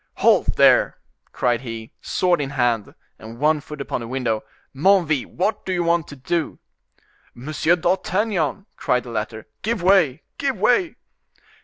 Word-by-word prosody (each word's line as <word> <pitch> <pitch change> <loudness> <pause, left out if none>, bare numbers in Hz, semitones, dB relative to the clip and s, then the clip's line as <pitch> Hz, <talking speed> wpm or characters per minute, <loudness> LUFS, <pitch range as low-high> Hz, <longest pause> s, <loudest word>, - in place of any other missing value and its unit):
"Halt, - - +3
there!" - - +5 0.3
cried 120 -2 0
he, 115 -3 -7
sword 180 -4 +1
in 135 - -3
hand, 120 -6 0 0.2
and 115 +1 -10
one 150 +2 +2
foot 150 0 -10
upon 140 - -3
the 115 - -6
window. 120 -3 -1 0.3
"Menneville, 160 -3 +3
what 195 +5 -2
do 190 - -4
you 175 -1 0
want 170 -1 +1
to 145 - -10
do?" 155 +5 -2 0.8
"Monsieur 155 +6 +1
d'Artagnan," 185 0 0
cried 125 -1 0
the 120 - -9
latter; 110 0 -4 0.2
"give 220 -3 -2
way, 180 -8 +3 0.2
give 275 -2 -1
way!" 330 +7 +2
150 Hz, 150 wpm, -22 LUFS, 125-180 Hz, 0.8 s, there